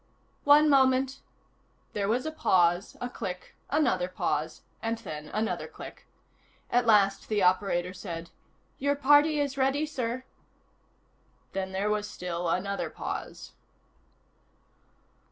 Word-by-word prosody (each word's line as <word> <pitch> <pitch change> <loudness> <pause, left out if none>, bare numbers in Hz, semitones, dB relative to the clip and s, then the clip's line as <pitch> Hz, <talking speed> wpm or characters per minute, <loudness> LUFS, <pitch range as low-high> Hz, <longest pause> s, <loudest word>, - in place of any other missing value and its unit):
"One 295 +1 +7
moment," 265 -1 +3 0.7
There 200 -1 -1
was 240 +6 0
a 315 - -2
pause, 180 - +2
a 245 - -3
click, 190 -7 -6
another 290 -12 +2
pause 160 -3 -2 0.2
and 230 0 -1
then 150 -9 -7
another 215 +6 -2
click. - - -11 0.6
At 245 -1 +2
last 200 -3 +4
the 210 -3 +1
operator 180 -1 +2
said: 170 -3 -7 0.5
"Your 285 +1 +1
party 290 +2 +5
is 280 -1 -1
ready, 270 +3 +2
sir." 255 -4 -3 1.3
Then 190 -1 -3
there 195 +2 0
was 210 0 -1
still 175 -1 -3
another 200 +3 -1
pause. - - -6
215 Hz, 120 wpm, -28 LUFS, 185-270 Hz, 1.3 s, One